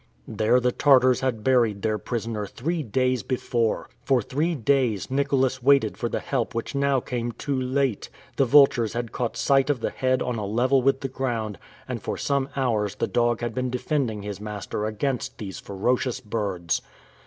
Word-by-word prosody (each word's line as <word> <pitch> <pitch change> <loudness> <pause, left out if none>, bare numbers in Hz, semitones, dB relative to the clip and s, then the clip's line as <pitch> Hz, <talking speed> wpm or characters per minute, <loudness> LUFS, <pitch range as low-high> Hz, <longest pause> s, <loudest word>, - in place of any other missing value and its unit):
There 110 +3 +2
the 125 0 +1
Tartars 130 -2 +4
had 125 -5 -2
buried 115 -6 +2
their 110 -1 0
prisoner 110 -1 -3
three 165 - -3
days 130 0 0
before! 120 0 -1 0.2
For 135 -2 +3
three 150 +9 -1
days, 130 -5 +1
Nicholas 135 -2 +1
waited 135 -4 +4
for 120 - -3
the - - -2
help 125 -5 -2
which 115 - -3
now 140 -1 +2
came 120 -1 -3
too 140 +3 -3
late! 130 -3 -1 0.3
The 135 - +4
vultures 125 -4 +5
had 120 -1 -3
caught 120 -2 -3
sight 135 0 +3
of 145 -4 +1
the - - -2
head 130 -1 0
on 125 -2 -2
a 105 - -3
level 125 +5 +2
with 135 +1 +2
the 135 - -2
ground, 120 -6 -3 0.3
and - - -4
for - - -3
some 140 -1 0
hours 110 -7 0
the - - 0
dog 120 -1 +1
had 120 -1 -2
been 130 +1 -1
defending 125 -4 -1
his 105 -1 -6
master 105 0 -4
against 125 +3 -2
these 100 -4 -6
ferocious 120 +5 -1
birds! 100 -6 -2
125 Hz, 180 wpm, -25 LUFS, 110-135 Hz, 0.3 s, vultures